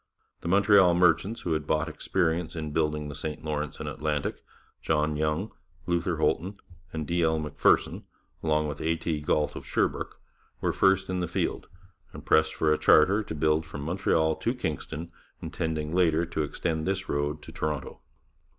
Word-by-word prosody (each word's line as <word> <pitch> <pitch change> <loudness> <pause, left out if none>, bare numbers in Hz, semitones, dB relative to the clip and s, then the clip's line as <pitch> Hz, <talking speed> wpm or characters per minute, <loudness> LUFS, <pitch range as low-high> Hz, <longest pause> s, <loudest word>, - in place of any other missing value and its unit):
The - - -7
Montreal 100 -1 +5
merchants 90 +5 +3
who 85 - -1
had 75 -1 -2
bought 80 +1 +1
experience 80 0 -1
in 80 -2 -4
building 75 -1 0
the 75 - -6
St 75 +2 -5
Lawrence 75 -1 -3
and 75 - -5
Atlantic, 75 0 -2 0.4
John 75 -1 +1
Young, 75 +7 -1 0.3
Luther 85 -1 0
Holton, 95 +4 0 0.3
and 80 -1 -4
D. 85 +3 0
L. 80 -1 +2
Macpherson, 75 -2 +1 0.4
with 75 -2 0
A. 80 +1 +1
T. 80 -1 -2
Galt 75 0 0
of - - -7
Sherbrooke, - - -1 0.4
were - - 0
first 95 0 +3
in 95 0 -2
the 90 - -1
field, - - -2 0.5
and - - -10
pressed 80 0 +3
for 75 -1 +2
a - - -1
charter 95 +8 +5
to 100 - -6
build 75 +1 +2
from 80 -3 -8
Montreal 80 -1 +1
to 120 - -1
Kingston, 80 - -4 0.3
intending 80 -1 -3
later 85 -2 +3
to 85 -2 -3
extend 80 +2 -2
this 95 +1 -1
road 75 +1 -2
to - - -10
Toronto. 75 -3 -4
80 Hz, 170 wpm, -27 LUFS, 75-85 Hz, 0.5 s, Montreal